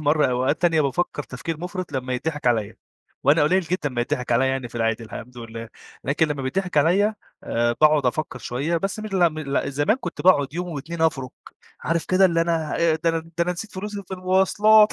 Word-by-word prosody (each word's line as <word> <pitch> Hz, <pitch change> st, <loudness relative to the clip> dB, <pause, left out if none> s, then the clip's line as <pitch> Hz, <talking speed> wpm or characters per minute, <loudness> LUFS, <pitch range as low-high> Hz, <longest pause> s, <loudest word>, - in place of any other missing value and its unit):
مرّة 150 Hz, 0 st, +3 dB
أوقات 130 Hz, +5 st, 0 dB
تانية 165 Hz, -3 st, +4 dB
بافَكّر 145 Hz, +2 st, -1 dB
تفكير 150 Hz, +5 st, -6 dB
مُفرِط 180 Hz, 0 st, -5 dB
لمّا 130 Hz, -1 st, -2 dB
يتضِحِك 150 Hz, +1 st, -3 dB
عليَّ، 110 Hz, -4 st, +1 dB, 0.5 s
وأنا 145 Hz, +4 st, +5 dB
قليل 180 Hz, +6 st, +3 dB
جدًا 175 Hz, -3 st, -2 dB
ما 125 Hz, -3 st, -3 dB
يتضِحِك 125 Hz, 0 st, -1 dB
عليَّ 130 Hz, +3 st, +3 dB
يعني 130 Hz, -2 st, -2 dB
في -, -, -20 dB
العادي 115 Hz, 0 st, 0 dB
الحمد 120 Hz, +3 st, -9 dB
لله، 115 Hz, 0 st, -8 dB, 0.4 s
لكن 150 Hz, +3 st, +1 dB
لمّا 145 Hz, -2 st, -3 dB
بيتضِحِك 180 Hz, +6 st, -2 dB
عليَّ 190 Hz, +8 st, +3 dB, 0.3 s
آآ، 120 Hz, 0 st, 0 dB
باقعد 150 Hz, -3 st, +5 dB
أفَكّر 130 Hz, +1 st, -2 dB
شوية 140 Hz, +8 st, -2 dB
بس 195 Hz, +4 st, -2 dB
م 215 Hz, -, -5 dB
لأ 190 Hz, -4 st, +3 dB
م 155 Hz, -, -8 dB
لأ، 140 Hz, -2 st, -1 dB
زمان 145 Hz, -, +2 dB
كُنت 260 Hz, -, -6 dB
باقعد 145 Hz, -6 st, +4 dB
يوم 180 Hz, +1 st, -3 dB
و2 160 Hz, +1 st, -5 dB
أفرُك 135 Hz, -5 st, 0 dB, 0.5 s
عارف 165 Hz, 0 st, -1 dB
كده 185 Hz, +1 st, +4 dB
اللي 170 Hz, -3 st, +3 dB
أنا 165 Hz, -2 st, 0 dB
أ 165 Hz, -1 st, +3 dB
ده 165 Hz, +1 st, +1 dB
أنا 165 Hz, -, 0 dB
ده 165 Hz, +1 st, -11 dB
أنا 180 Hz, -, 0 dB
نسيت 200 Hz, +4 st, -7 dB
فلوسي 205 Hz, +1 st, -5 dB
في 190 Hz, -, -4 dB
المواصلات. 190 Hz, +4 st, +4 dB
155 Hz, 210 wpm, -23 LUFS, 130-180 Hz, 0.5 s, وأنا